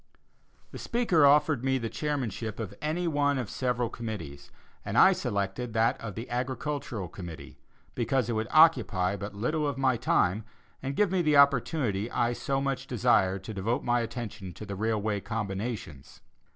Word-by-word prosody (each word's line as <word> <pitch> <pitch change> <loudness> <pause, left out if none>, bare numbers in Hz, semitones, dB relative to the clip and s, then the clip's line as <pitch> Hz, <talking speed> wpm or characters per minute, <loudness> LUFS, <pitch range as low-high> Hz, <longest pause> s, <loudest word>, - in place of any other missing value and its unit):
The - - -8
speaker 185 -12 +3
offered 150 -2 +4
me 130 0 +2
the 115 -3 -3
chairmanship 115 -7 -3
of 110 -5 -5
any 160 +4 -1
one 145 -2 +1
of 120 -5 -4
several 125 -2 -1
committees, 85 -13 -7 0.3
and - - -3
I - - +8
selected 100 +4 -3
that 115 +3 +1
of 110 -4 -6
the 115 +2 -6
Agricultural 125 -4 -3
committee, 85 -2 -10 0.3
because 125 +1 0
it 120 - -1
would 110 0 -1
occupy 120 - +4
but 100 0 -7
little 150 +8 -1
of 140 -2 -3
my 130 -2 +2
time, 100 0 +1 0.4
and 135 +1 -3
give 205 +1 +2
me 190 -2 +2
the 150 -3 +3
opportunity 130 - +3
I 120 0 0
so 135 +3 -1
much 135 -1 -2
desired 95 -5 +2
to 110 - -6
devote 105 +5 -1
my 120 0 +2
attention 110 -5 -5
to 105 - -9
the 100 -1 -5
railway 110 0 -1
combinations. 100 - -5
120 Hz, 165 wpm, -28 LUFS, 105-135 Hz, 0.4 s, I